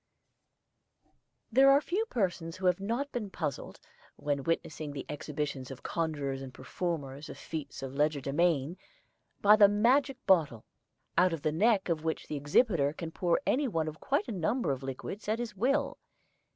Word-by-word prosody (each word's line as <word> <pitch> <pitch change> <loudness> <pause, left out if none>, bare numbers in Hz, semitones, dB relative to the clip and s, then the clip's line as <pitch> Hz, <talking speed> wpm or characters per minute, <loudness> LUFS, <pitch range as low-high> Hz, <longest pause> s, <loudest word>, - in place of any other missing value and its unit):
There 265 +4 +6
are 275 +1 +7
few 390 +9 -1
persons 180 - -2
who 185 - -5
have 180 0 +3
not 235 +8 -2
been 225 -5 -4
puzzled, 145 -7 -4 0.4
when 145 -1 -2
witnessing 155 -1 -2
the 140 - -6
exhibitions 145 -3 -4
of 135 - -9
conjurers 145 -5 -2
and 135 -1 -7
performers 140 +1 -4
of - - -8
feats 150 -4 -6
of 135 -1 -5
legerdemain, 150 +2 +1 0.6
by 210 +1 +8
the 205 -1 +8
magic 250 +7 +3
bottle, 150 - +3 0.5
out 180 -1 +4
of 160 - -5
the 155 - +1
neck 200 +4 +3
of 165 -3 -1
which 160 -1 -2
the 150 - -5
exhibitor 145 - +2
can 160 0 -6
pour 175 +4 +1
any 280 +2 +2
one 165 -8 -1
of 155 0 -6
quite - - 0
a - - -4
number 210 - 0
of 135 -1 -3
liquids 135 - -6
at 215 +1 +1
his 235 -3 -5
will. 275 +7 0
165 Hz, 165 wpm, -30 LUFS, 145-215 Hz, 0.6 s, by